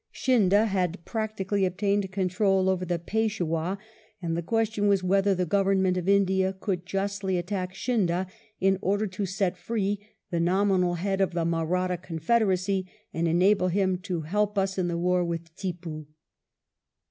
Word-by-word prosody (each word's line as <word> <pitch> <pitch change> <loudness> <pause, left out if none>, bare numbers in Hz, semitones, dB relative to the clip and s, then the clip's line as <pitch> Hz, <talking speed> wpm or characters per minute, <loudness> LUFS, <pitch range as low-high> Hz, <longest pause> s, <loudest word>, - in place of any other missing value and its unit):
Scindia 215 -4 +3
had 185 -4 -1
practically 210 -3 -2
obtained 195 +1 0
control 190 0 +1
over 185 -1 0
the 175 -1 -1
Peishwah, 185 -3 -1 0.4
and 165 -2 -2
the 170 - -1
question 220 +2 0
was 200 -2 +3
whether 195 +1 +3
the 180 0 0
Government 190 0 +2
of 180 +1 -1
India 190 -1 +3
could 185 -3 -3
justly 195 -1 -1
attack 185 +1 -3
Scindia 190 -6 0 0.3
in 190 0 +2
order 205 +3 +1
to 195 0 -3
set 190 -1 -1
free 205 -2 -1 0.3
the 170 - 0
nominal 180 0 +2
head 195 +2 -1
of 190 - +1
the 170 -1 0
Mahratta 175 +2 0
confederacy, 185 +2 0 0.2
and 165 +1 0
enable 185 +3 +3
him 185 0 +1
to 180 -3 -3
help 205 +6 -1
us 195 0 0
in 180 - +1
the 170 -1 -1
war 180 +1 +2
with 165 -1 -5
Tippoo. 170 -5 -5
190 Hz, 155 wpm, -27 LUFS, 175-200 Hz, 0.4 s, Scindia